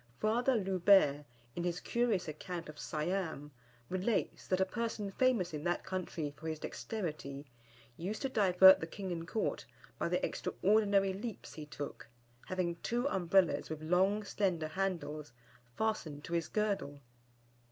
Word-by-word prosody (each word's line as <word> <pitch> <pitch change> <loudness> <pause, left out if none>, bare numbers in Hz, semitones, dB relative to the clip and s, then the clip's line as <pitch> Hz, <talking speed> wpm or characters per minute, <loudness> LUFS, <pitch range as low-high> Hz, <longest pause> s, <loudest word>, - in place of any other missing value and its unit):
Father 240 +4 +2
Loubère, 185 -6 +4 0.3
in 170 - -2
his 175 0 -1
curious 235 -7 0
account 170 +3 -5
of 155 0 -10
Siam, 160 -2 -2 0.4
relates, 185 +5 -1
that 185 - +1
a 190 - +4
person 220 -1 -3
famous 210 -7 +2
in 150 -1 -4
that 175 0 0
country 165 -5 -3
for 160 - -8
his 160 -1 -2
dexterity, 150 -8 -5 0.5
used 195 +9 -4
to 270 - 0
divert 190 -4 +7
the 160 - -4
King 190 +1 -5
and 165 -1 -4
Court 220 - -2 0.3
by - - 0
the - - +1
extraordinary 200 -2 +2
leaps 200 - -6
he 150 0 -8
took, 145 -1 -7 0.4
having 180 -2 -1
two 240 +8 -1
Umbrellas 185 -1 +2
with 155 -1 -5
long 190 +6 +2
slender 180 -6 -1
handles, 155 -6 -3 0.4
fastened 165 -10 -1
to 170 - -6
his 165 -2 0
girdle. 200 -8 -1
185 Hz, 145 wpm, -34 LUFS, 160-205 Hz, 0.5 s, divert